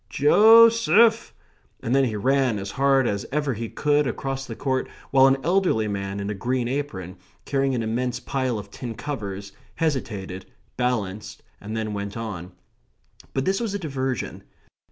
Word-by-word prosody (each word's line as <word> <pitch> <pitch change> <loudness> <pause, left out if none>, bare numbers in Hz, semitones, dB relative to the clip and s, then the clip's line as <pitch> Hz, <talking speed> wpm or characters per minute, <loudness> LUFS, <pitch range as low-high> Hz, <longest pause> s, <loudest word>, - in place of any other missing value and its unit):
Jo 220 +11 +7
seph!" 225 +1 +3 0.5
and 115 - -2
then 135 0 +4
he 110 -4 -2
ran 130 +1 +1
as 100 0 -5
hard 135 +1 +3
as 100 -1 -1
ever 145 -1 0
he 115 0 -5
could 150 -1 +1
across 135 +2 -4
the 115 - -6
court, 130 0 -1 0.2
while 135 -1 +6
an 135 0 +3
elderly 175 - +2
man, 100 -1 -3
in 100 +1 -3
a - - -2
green 120 +4 -1
apron, 100 -10 -4 0.3
carrying 135 -1 0
an 115 - -1
immense 120 +2 -2
pile 130 -2 -2
of 100 -1 -8
tin 120 -3 -6
covers, 100 -9 -5 0.2
hesitated, 105 - -3 0.3
balanced, 110 -3 -2 0.2
and 110 +2 -6
then 110 -1 -3
went 100 +1 -5
on. 100 -6 -6 0.8
But 135 - 0
this 195 +1 +1
was 225 -4 -2
a - - -2
diversion. 135 - -3
125 Hz, 165 wpm, -24 LUFS, 105-140 Hz, 0.8 s, Jo